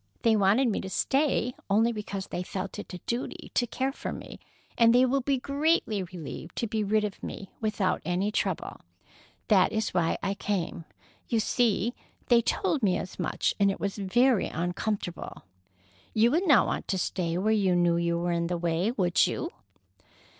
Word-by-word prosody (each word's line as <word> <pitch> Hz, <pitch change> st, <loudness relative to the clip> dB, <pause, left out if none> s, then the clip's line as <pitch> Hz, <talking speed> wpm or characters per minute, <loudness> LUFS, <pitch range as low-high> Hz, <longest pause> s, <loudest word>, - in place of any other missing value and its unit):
They 225 Hz, -2 st, +5 dB
wanted 210 Hz, +6 st, +4 dB
me 220 Hz, -, 0 dB
to 190 Hz, -, -6 dB
stay 265 Hz, +1 st, +1 dB, 0.2 s
only 220 Hz, +4 st, +3 dB
because 200 Hz, -3 st, -5 dB
they -, -, -4 dB
felt 190 Hz, +2 st, -5 dB
it -, -, -8 dB
a 180 Hz, -, -5 dB
duty 240 Hz, +2 st, -4 dB
to 245 Hz, -, +1 dB
care 265 Hz, +3 st, -1 dB
for -, -, -5 dB
me, -, -, -8 dB, 0.4 s
and 230 Hz, 0 st, +5 dB
they 250 Hz, +1 st, +6 dB
will 270 Hz, +2 st, +1 dB
be 275 Hz, +1 st, +1 dB
greatly 280 Hz, -, +1 dB
relieved 170 Hz, -2 st, -8 dB
to -, -, -1 dB
be 220 Hz, -1 st, -1 dB
rid 210 Hz, +1 st, +2 dB
of 205 Hz, -2 st, -4 dB
me 195 Hz, -, -7 dB
without 210 Hz, -3 st, 0 dB
any 180 Hz, +5 st, 0 dB
trouble. -, -, -2 dB, 0.7 s
That 195 Hz, -4 st, +4 dB
is 220 Hz, -1 st, -1 dB
why 170 Hz, -2 st, +1 dB
I 195 Hz, 0 st, 0 dB
came. 185 Hz, -5 st, -3 dB, 0.4 s
You 230 Hz, -, +2 dB
see, 230 Hz, 0 st, +1 dB, 0.4 s
they 240 Hz, -1 st, +6 dB
told 310 Hz, -, 0 dB
me 185 Hz, -4 st, +2 dB
as 185 Hz, -, -7 dB
much, -, -, 0 dB
and 200 Hz, -1 st, +4 dB
it 195 Hz, -, -2 dB
was 200 Hz, -1 st, -2 dB
very 240 Hz, +4 st, +3 dB
uncomfortable. 175 Hz, +2 st, -3 dB, 0.7 s
You 225 Hz, +2 st, +4 dB
would 350 Hz, +6 st, +1 dB
not 290 Hz, -, +6 dB
want -, -, -3 dB
to 195 Hz, -, 0 dB
stay 175 Hz, -2 st, -1 dB
where 215 Hz, +4 st, +2 dB
you 195 Hz, -4 st, +2 dB
knew 175 Hz, -1 st, +3 dB
you 170 Hz, 0 st, 0 dB
were 175 Hz, +1 st, -1 dB
in 170 Hz, 0 st, 0 dB
the 175 Hz, 0 st, -1 dB
way, 170 Hz, +3 st, 0 dB
would 185 Hz, -7 st, +2 dB
you?" 335 Hz, -, -3 dB
205 Hz, 185 wpm, -28 LUFS, 180-235 Hz, 0.7 s, they